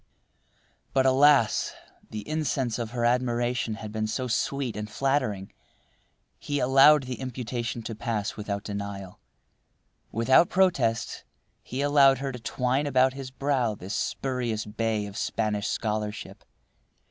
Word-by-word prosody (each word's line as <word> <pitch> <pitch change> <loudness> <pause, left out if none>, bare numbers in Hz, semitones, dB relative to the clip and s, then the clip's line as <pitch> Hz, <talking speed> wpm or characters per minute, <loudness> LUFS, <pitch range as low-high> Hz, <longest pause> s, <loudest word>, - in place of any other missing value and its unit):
But, 135 -1 +3
alas! 135 -3 +4 0.3
the 105 -1 -7
incense 140 -6 -1
of 115 -2 -3
her 120 0 -2
admiration 120 -1 0
had 110 -1 -8
been 110 0 -2
so 130 +4 -2
sweet 125 0 -1
and 105 0 -5
flattering. 125 -6 -1 0.9
He 145 - -3
allowed 135 +3 +6
the 125 -1 -6
imputation 120 -2 -4
to 115 - -5
pass 110 -1 -3
without 100 -1 -4
denial. 100 -2 -6 0.9
Without 130 +9 +4
protest, 140 -12 +1 0.4
he 130 +3 -5
allowed 140 -2 +5
her 135 +1 -3
to 125 - -8
twine 125 +4 -1
about 130 -1 +3
his 135 -1 -7
brow 130 -4 0
this 95 +1 -7
spurious 125 -5 -2
bay 110 0 -1
of 100 -1 -8
Spanish 105 -2 -1
scholarship. 105 -1 -3
120 Hz, 130 wpm, -27 LUFS, 110-135 Hz, 0.9 s, allowed